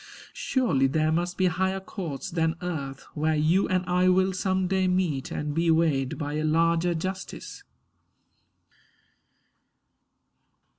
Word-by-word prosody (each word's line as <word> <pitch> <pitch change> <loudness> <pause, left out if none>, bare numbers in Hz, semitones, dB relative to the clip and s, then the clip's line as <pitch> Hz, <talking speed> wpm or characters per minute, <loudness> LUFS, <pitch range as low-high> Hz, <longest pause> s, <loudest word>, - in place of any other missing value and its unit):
Surely 180 - +1
there 155 +3 +1
must 175 +2 -1
be 185 - +2
higher 190 +2 0
courts 180 -7 -6
than 165 -1 0
earth, 140 -6 -4
Where 155 +1 0
you 160 +6 +2
and 185 0 +1
I 180 +1 +3
will 190 +1 +3
some 185 0 0
day 190 0 +1
meet 180 -7 0
and 150 0 -3
be 165 +2 +1
Weighed 155 -5 +2
by 145 -1 -3
a 155 - -1
larger 165 +2 +2
justice. 185 +4 -6
170 Hz, 130 wpm, -26 LUFS, 155-185 Hz, -, I